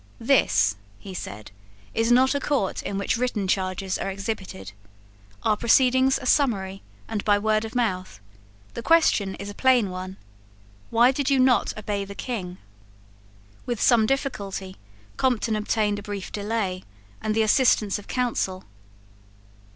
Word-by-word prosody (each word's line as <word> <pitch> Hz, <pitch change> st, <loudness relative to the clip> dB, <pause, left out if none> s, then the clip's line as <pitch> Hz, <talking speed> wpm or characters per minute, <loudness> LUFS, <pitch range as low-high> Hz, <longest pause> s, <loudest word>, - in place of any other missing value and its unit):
"This," -, -, +3 dB, 0.2 s
he 190 Hz, -, -10 dB
said, 105 Hz, -, -7 dB, 0.4 s
"is 225 Hz, +1 st, +1 dB
not 260 Hz, +3 st, +5 dB
a 285 Hz, -, 0 dB
court 270 Hz, -9 st, -1 dB
in 195 Hz, -, -4 dB
which 200 Hz, +4 st, 0 dB
written 235 Hz, -5 st, -1 dB
charges 185 Hz, 0 st, -1 dB
are -, -, -2 dB
exhibited. 190 Hz, -, -5 dB, 0.7 s
Our 215 Hz, -, +3 dB
proceedings 260 Hz, +3 st, +4 dB
are 260 Hz, -, -9 dB
summary, 195 Hz, -9 st, +1 dB, 0.3 s
and 215 Hz, -3 st, -3 dB
by 205 Hz, -1 st, +3 dB
word 215 Hz, +1 st, +1 dB
of 225 Hz, -, -9 dB
mouth. 185 Hz, -, -2 dB, 0.5 s
The -, -, -5 dB
question 230 Hz, -11 st, +3 dB
is 200 Hz, -, -8 dB
a -, -, -10 dB
plain 245 Hz, -5 st, +3 dB
one. 185 Hz, +1 st, -7 dB, 0.7 s
Why 235 Hz, +2 st, +5 dB
did 275 Hz, +1 st, -1 dB
you 275 Hz, -, +3 dB
not 255 Hz, -3 st, +3 dB
obey 205 Hz, -1 st, -3 dB
the 200 Hz, 0 st, -9 dB
King?" 190 Hz, -8 st, -5 dB, 1.1 s
With 240 Hz, -3 st, -2 dB
some 230 Hz, -3 st, +4 dB
difficulty 200 Hz, -8 st, -3 dB, 0.4 s
Compton 235 Hz, -4 st, +1 dB
obtained 210 Hz, -1 st, 0 dB
a -, -, -8 dB
brief 200 Hz, -2 st, -6 dB
delay, 205 Hz, -3 st, -2 dB, 0.4 s
and 215 Hz, 0 st, -1 dB
the 220 Hz, -, +3 dB
assistance 215 Hz, -3 st, +3 dB
of 205 Hz, -, -14 dB
counsel. 230 Hz, -7 st, -1 dB
215 Hz, 145 wpm, -24 LUFS, 195-245 Hz, 1.1 s, not